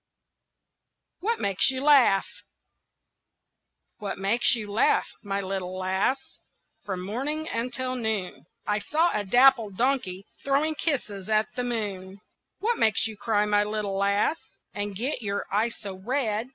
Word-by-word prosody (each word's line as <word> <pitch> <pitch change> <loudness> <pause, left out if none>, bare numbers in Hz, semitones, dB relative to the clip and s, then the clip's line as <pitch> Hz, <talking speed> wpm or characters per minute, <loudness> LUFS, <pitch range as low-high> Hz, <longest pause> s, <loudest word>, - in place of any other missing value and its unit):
WHAT 450 +5 -1
MAKES 195 +3 +3
YOU 260 0 -2
LAUGH? 265 -10 +5 1.7
"What 205 -2 -4
makes 210 +6 +2
you 210 -3 -6
laugh, 215 - +3 0.2
my 200 -1 -2
little 185 -1 -4
lass, 190 +8 -1 0.4
From 190 -3 -4
morning 290 +9 -2
until 255 +1 -2
noon?" 210 - -3 0.2
"I 210 0 0
saw 315 +10 +1
a 210 - 0
dappled 230 -2 +4
donkey 230 -8 0 0.2
Throwing 285 +3 +1
kisses 225 - -3
at 215 0 +2
the 250 - -1
moon." 200 -5 -4 0.4
"What 460 +3 0
makes 220 -2 +3
you 220 -1 -3
cry, 210 0 +1
my 205 0 +3
little 210 -2 -3
lass, 200 +10 +1 0.3
And 205 -1 -3
get 250 +5 -1
your 200 -2 -2
eyes 225 +3 +1
so 200 -3 -6
red?" 225 +2 -2
215 Hz, 140 wpm, -26 LUFS, 200-255 Hz, 1.7 s, LAUGH